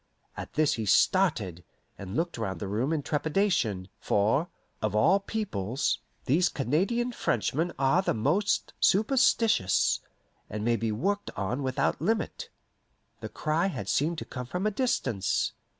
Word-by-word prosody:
At - - -7
this 155 -1 +2
he 110 -5 -3
started, 100 - +2 0.3
and 100 +1 -7
looked 165 -4 -1
round 95 -4 -3
the 100 - -4
room 115 +9 -1
in 155 -3 -1
trepidation; 150 - 0
for, 115 - +1 0.3
of 110 -1 -1
all 170 - +4
peoples, 135 - -2 0.3
these 170 +8 +3
Canadian 195 - 0
Frenchmen 165 - -1
are 135 +7 +3
the 190 - 0
most 155 - +1
superstitious, 220 - +3 0.5
and 105 +1 -4
may 120 0 +3
be 115 0 -1
worked 200 - -1
on 100 +8 -2
without 130 +1 0
limit. 220 +6 -1 0.7
The - - -6
cry 160 +4 0
had 195 - -5
seemed 160 +4 +1
to - - -5
come 125 -1 -7
from 180 +9 -3
a 215 - +2
distance. 200 - 0
150 Hz, 145 wpm, -28 LUFS, -, 0.7 s, all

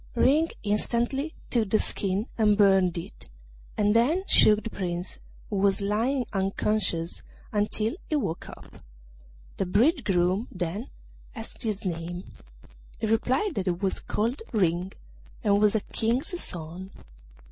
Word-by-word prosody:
Ring 310 +5 +4
instantly 240 +8 0 0.2
took 225 -5 +2
the 215 - +4
skin 195 0 -1
and 210 -2 +3
burned 195 -4 +4
it, 170 - -8 0.5
and 210 0 +3
then 295 +11 +3
shook 210 0 +6
the 225 - -4
Prince, 175 -2 -4 0.3
who 205 - -1
was 195 0 +2
lying 230 +6 0
unconscious, 195 -3 0 0.3
until 215 +3 +1
he 310 - +1
woke 170 - -2
up. - - -13 0.8
The 195 - -1
bridegroom 205 - +2
then 180 +6 -4 0.5
asked 225 -2 -9
his 215 -4 -3
name; 175 0 -4 0.7
he - - -2
replied 255 - +1
that 195 -6 -3
he 180 - +3
was 190 +2 -1
called 235 - -2
Ring, 180 -4 +1 0.5
and 205 -1 +3
was 210 0 +4
a 220 - +2
King's 250 - -1
son. 175 +3 -6
210 Hz, 135 wpm, -27 LUFS, 185-230 Hz, 0.8 s, shook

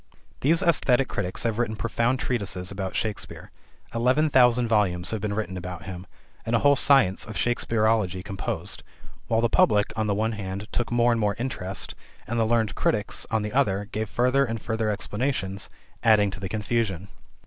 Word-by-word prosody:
These 165 +7 +2
esthetic 135 -7 +3
critics 90 -2 -1
have 115 -1 -1
written 115 -2 0
profound 115 +3 0
treatises 100 -8 -1
about 95 -1 -4
Shakespeare. 110 -2 -4 0.4
Eleven 130 +6 +2
thousand 125 -2 +4
volumes 95 -5 +1
have 110 -2 -3
been 105 -1 -2
written 95 -4 -3
about 90 -1 -7
him, 90 -1 -8 0.4
and 115 - 0
a 115 - 0
whole 145 0 +6
science 130 -9 +4
of 110 - -8
Shakespearology 110 -3 +1
composed; 100 -2 -4 0.5
while 115 0 +2
the 120 - +3
public, 105 -2 +3
on 110 -1 -1
the 100 - +1
one 110 +2 0
hand, 100 -1 -5
took 120 -1 -2
more 120 0 +3
and 115 -1 0
more 105 -1 +1
interest, 100 -7 -3 0.3
and 120 0 -2
the 115 - +3
learned 110 -4 +1
critics, - - 0
on 110 -1 0
the 105 0 -4
other 95 -1 +2
hand, 100 +2 -8
gave 110 -1 -3
further 125 +4 +2
and 115 -3 -3
further 110 0 -2
explanations, 105 -2 -2 0.3
adding 105 -3 +4
to 95 - -8
the 95 -1 -5
confusion. 105 -3 -2
110 Hz, 180 wpm, -25 LUFS, 100-120 Hz, 0.5 s, whole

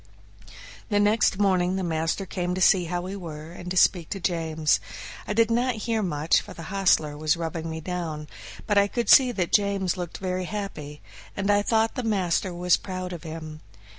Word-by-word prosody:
The 205 - +2
next 205 -1 +3
morning 185 -2 +2
the 190 - -2
master 165 +3 -1
came 180 -1 -3
to - - -3
see 185 -1 +4
how 175 +1 -2
we 185 +2 -6
were 160 -4 -8
and 175 0 -8
to 185 - -2
speak 175 -2 +3
to 195 - -4
James. 160 -3 +1 0.5
I - - -1
did 230 +1 +3
not 245 +1 +1
hear 225 -2 0
much, 155 -4 +1
for - - -11
the 165 - -8
hostler 175 -6 +2
was 155 +2 +1
rubbing 165 0 -4
me 160 0 -5
down, 160 -3 -4 0.4
but 205 -1 +3
I 200 - +3
could 235 +3 -2
see 260 -3 +7
that 180 -5 -2
James 200 -3 +2
looked 175 -2 -5
very 185 -1 -3
happy, 160 -8 -6 0.3
and 200 0 +1
I 205 0 +4
thought 225 +1 +1
the 255 - -3
master 190 -5 0
was 175 0 +2
proud 185 -1 -6
of 170 - -7
him. 155 -2 -8
180 Hz, 195 wpm, -25 LUFS, 165-200 Hz, 0.5 s, see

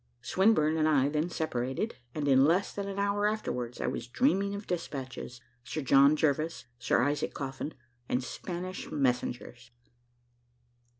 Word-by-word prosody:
Swinburne 180 -6 +3
and 155 -1 +3
I 140 -2 +3
then 155 +3 0
separated, 145 - -2 0.2
and 150 -2 -1
in 135 -1 +6
less 175 +7 +2
than 200 -1 -4
an 200 0 -5
hour 200 +1 +1
afterwards 125 - -3
I - - -1
was 120 - -3
dreaming 200 - +1
of 200 +1 -6
despatches 135 -7 -5 0.2
Sir 155 - -4
John 140 +2 +6
Jervis 155 -1 0
Sir 125 - +2
Isaac 145 +2 -1
Coffin 135 +2 -5 0.3
and 125 +1 0
Spanish 180 +7 -6
messengers. 125 -2 -1
155 Hz, 140 wpm, -30 LUFS, 130-185 Hz, 0.3 s, in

